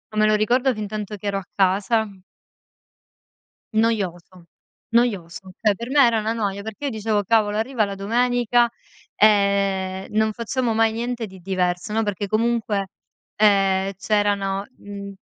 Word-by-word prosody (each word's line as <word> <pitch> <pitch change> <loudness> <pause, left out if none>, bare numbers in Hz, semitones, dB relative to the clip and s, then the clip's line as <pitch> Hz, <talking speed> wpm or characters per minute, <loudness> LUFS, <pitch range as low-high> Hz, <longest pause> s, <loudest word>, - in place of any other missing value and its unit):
Me 215 0 +3
lo 215 0 +4
ricordo 245 +5 +2
fintanto 210 -1 -5
che 205 - -7
ero 200 0 0
a 195 - -6
casa 200 +3 +2 1.7
noioso, 185 -6 -1 0.5
noioso. 190 -6 0
Cioè, 210 -3 +3
per 235 +4 -7
me 285 0 +4
era 230 -1 +2
una 215 +1 -1
noia, 200 -3 -2
perché 220 +6 -7
io - - 0
dicevo: 215 -3 -1
"Cavolo, 210 -1 +2
arriva 225 +1 0
la 200 -1 -5
domenica, 240 +3 +2 0.5
ehm, 200 -2 +2
non 220 +1 +2
facciamo 235 +2 -2
mai 225 0 +2
niente 240 0 -3
di 190 -1 -13
diverso", 180 0 -1
no, 220 +1 +1
perché 205 -1 -3
comunque, 215 -2 0 0.5
ehm, 195 -2 +3
c'erano 200 -1 0
mhmm, 200 -1 -8
210 Hz, 140 wpm, -22 LUFS, 195-225 Hz, 1.7 s, lo